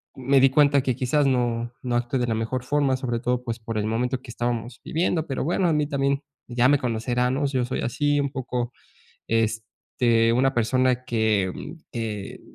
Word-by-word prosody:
m 130 -1 -10
me 140 -1 +6
di 135 - +6
cuenta 145 0 +4
que 130 -1 -1
quizás 135 +4 +1
no 120 -2 0
no 125 -1 -1
actué 120 +2 -1
de 120 - 0
la 115 - 0
mejor 115 +3 -2
forma, 140 0 +1
sobre 120 -3 -2
todo, 125 +1 -1
pues, 115 -1 -4
por 115 0 -5
el 105 0 0
momento 125 +3 -1
que 130 - -10
estábamos 120 0 -3
viviendo, 165 0 0
pero 135 - -2
bueno, 175 +3 +1
a 160 - +2
mí 150 -1 +2
también 140 0 0 0.2
ya 120 +1 +3
me 145 - +5
conocerán, 125 +1 0
¿no? 145 - 0
Yo 130 -3 0
soy 125 - -3
así, 145 +5 +1
un 140 - -2
poco, 125 -3 -3 0.6
este, 115 +1 +1
una 135 +2 +3
persona 125 +2 +1
que, 110 -5 +1
mm, - - -8 0.2
que, 110 -4 -5
125 Hz, 200 wpm, -24 LUFS, 115-135 Hz, 0.6 s, me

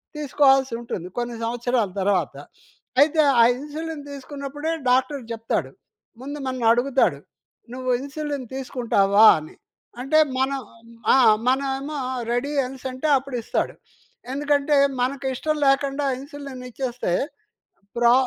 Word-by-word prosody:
తీసుకోవాల్సి 270 -3 +3
ఉంటుంది, 180 -6 -5
కొన్ని 240 -1 -2
సంవత్సరాల 240 -1 0
తర్వాత. 195 0 +1 0.7
అయితే 310 +2 +4 0.2
ఆ - - +8 0.2
ఇన్సులిన్ 305 +1 -6
తీసుకున్నప్పుడే 280 +3 -5 0.2
డాక్టర్ 260 +2 +2
చెప్తాడు. 225 0 -2 0.5
ముందు 285 +3 -6
మనల్ని 255 -2 -2
అడుగుతాడు. 260 +3 +2 0.5
"నువ్వు 255 0 -4
ఇన్సులిన్ 285 -1 -5
తీసుకుంటావా?" 225 -6 +3
అని 155 0 -12 0.5
అంటే 310 +5 +3 0.2
మనం 270 +1 0 0.5
ఆ! - - +6 0.3
మనమేమో 275 +3 0 0.3
రెడీ 245 +4 -1
అనేసంటే 260 +2 -5
అప్పుడు 270 -1 -6
ఇస్తాడు. - - -2 0.6
ఎందుకంటే 290 +1 +1 0.3
మనకు 270 +2 -1
ఇష్టం 305 +4 -1
లేకుండా 275 +1 +2
ఇన్సులిన్ 280 -2 -9
ఇచ్చేస్తే 245 -6 -3 0.8
ప్రా 235 0 +5
270 Hz, 110 wpm, -23 LUFS, 245-285 Hz, 0.8 s, ఆ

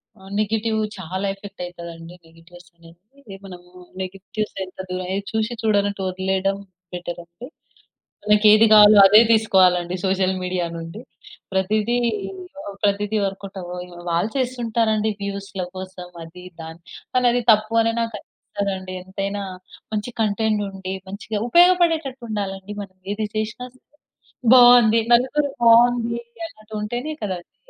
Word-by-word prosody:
ఆ! - - -23 0.2
నెగెటివ్ 220 +1 0 0.2
చాలా 185 +2 -4
effect 195 -1 -11
అయితాదండి. 170 -1 -10
Negatives 170 +2 -18
ఆనేది 170 0 -18 0.2
అంటే 220 -9 -12
మనం 180 -2 -10 0.4
నెగెటివ్స్ 195 +3 -5
ఎంత 185 - -17
దూర‌యి 185 +1 -3
చూసి 220 +1 -1
చూడనట్టు 205 -2 +1
వదిలేయడం 190 +1 -1 0.4
బెటర్ 175 -1 -5
అండి. 170 +9 -12 0.8
మనకి 210 0 +4
ఏది 215 +1 +6
కావాలో 210 -1 +8
అదే 210 +3 +8
తీసుకోవాలి 190 -5 +4
అండి 175 +1 -6
సోషల్ 190 0 +1
మీడియా 180 -1 -1
నుండి. 165 +5 -8 0.5
ప్రతిది 210 +5 +1 0.7
ఓహ్! 200 - -7
ప్రతిది 205 +1 +1
వర్కౌట్ 195 0 -5
ఆవవ్వు. 180 0 -8
వాళ్ళు 175 +6 0
చేస్తుంటారండి 230 -4 0
వ్యూస్‌ల 200 -1 -5
కోసం 185 -1 -8 0.2
అది 180 +2 -13 0.2
దాని 160 +1 -10 0.3
కానీ 250 -1 +2
అది 245 0 0
తప్పు 215 +1 0
అని 230 0 +1
నాకు 230 -1 -3
అనిపిస్తదండి 195 -3 -6
ఎంతైనా 195 +2 -4 0.5
మంచి 215 +3 -3
కంటెంట్ 215 0 +1
ఉండి 190 -1 -6
మంచిగా 205 +2 -5
ఉపయోగపడేటట్టు 335 -6 +3
ఉండాలండి 195 -1 -4
మనం 190 -2 -12 0.2
ఏది 215 +1 -2
చేసినా 220 +3 -3
సరే 255 - -27 0.7
బాగుంది 240 -2 +7
నలుగురు 270 +4 +3
బాగుంది 235 0 +4 0.3
అన్నట్టు 215 -9 -14
ఉంటేనే 240 +8 -4
కదా 190 -3 -2
అదీ... - - -45
200 Hz, 130 wpm, -22 LUFS, 185-225 Hz, 0.8 s, కావాలో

